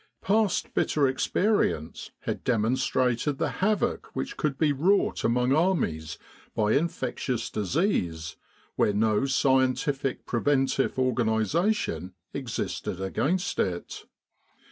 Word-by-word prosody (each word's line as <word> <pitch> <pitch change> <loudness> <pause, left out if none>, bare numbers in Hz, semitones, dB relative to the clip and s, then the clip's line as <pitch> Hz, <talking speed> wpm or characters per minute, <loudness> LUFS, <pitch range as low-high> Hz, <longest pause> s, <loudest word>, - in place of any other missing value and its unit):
Past 210 0 +1
bitter 145 -3 +2
experience 130 - 0
had - - -4
demonstrated 125 +3 +1
the - - 0
havoc 210 +2 +1
which 135 - -3
could 145 -3 -1
be 150 -1 +2
wrought 185 +9 +2
among 125 +2 +2
armies 140 - 0 0.4
by 105 -1 +2
infectious 130 -5 -1
disease 90 - -1 0.4
where 105 - +2
no 110 +4 +2
scientific 135 +1 +1
preventive 135 +2 +1
organisation 110 - 0 0.2
existed 115 -7 -4
against 155 - -1
it. 90 -2 -2
130 Hz, 100 wpm, -27 LUFS, 110-150 Hz, 0.4 s, bitter